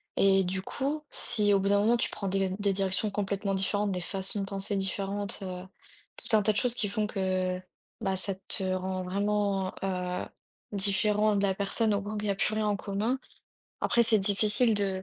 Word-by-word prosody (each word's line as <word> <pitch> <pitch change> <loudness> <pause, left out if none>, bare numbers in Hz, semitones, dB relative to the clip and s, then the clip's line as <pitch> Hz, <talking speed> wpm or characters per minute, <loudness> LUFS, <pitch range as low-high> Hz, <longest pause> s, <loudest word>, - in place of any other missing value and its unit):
et 195 -1 +4
du 190 +1 -3
coup, 290 +6 -3
si 210 -3 +2
au 195 - +4
bout 195 +1 0
d'un 200 0 +4
moment, 225 +3 +4
tu - - 0
prends 200 - -5
des 195 0 +1
d 185 - -3
des 200 -1 +1
directions 195 +2 0
complètement 200 0 -1
différentes, 200 +1 0
des 180 -1 -2
façons 195 +2 -2
de 195 - -1
penser 195 +1 -1
différentes, 195 +1 -2
heu, 180 -1 -5 0.5
tout 220 - +1
un 215 - +5
tas 215 +1 +2
de - - -3
choses 250 0 +2
qui 215 -4 -2
font 210 +1 0
que, 185 -2 -1 0.4
bah, 195 -2 0
ça 190 +1 -2
te 195 - 0
rend 185 0 -2
vraiment, 200 0 0
heu, 180 -1 -2 0.5
différent 205 +1 +2
de 200 - +1
la 195 -1 +2
personne, 205 +3 +1
au 200 - 0
point 210 +1 -5
qu'il 210 - -3
y - - +4
a - - -1
plus 215 +2 0
rien 215 -1 0
en 210 - +2
commun. 210 +6 -1 0.6
Après, 235 - +3
c'est 220 -1 +5
difficile 210 +4 +4
de 195 -2 0
200 Hz, 210 wpm, -29 LUFS, 190-210 Hz, 0.6 s, un